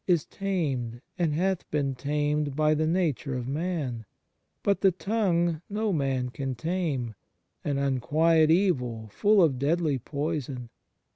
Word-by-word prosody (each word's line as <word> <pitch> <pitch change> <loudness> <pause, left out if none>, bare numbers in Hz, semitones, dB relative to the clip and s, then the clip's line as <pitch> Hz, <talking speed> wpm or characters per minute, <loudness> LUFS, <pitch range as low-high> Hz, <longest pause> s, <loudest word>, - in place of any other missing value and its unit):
is 175 -4 +3
tamed, 140 - -2 0.2
and 170 -3 +2
hath 185 +2 0
been 140 -2 0
tamed, 145 +1 -1
by 155 0 +3
the 155 +1 +1
nature 155 -6 0
of 125 -1 -3
man: 145 -6 -2 0.6
but 200 -1 +2
the 195 - +6
tongue 175 -5 0
no 210 0 0
man 135 -4 0
can 135 0 -4
tame, 145 -5 -2 0.5
an 145 -2 -1
unquiet 155 +4 +3
evil, 125 - +1
full 205 - +4
of 135 -6 +2
deadly 150 -1 +1
poison. 140 -3 -4
150 Hz, 135 wpm, -27 LUFS, 135-175 Hz, 0.6 s, the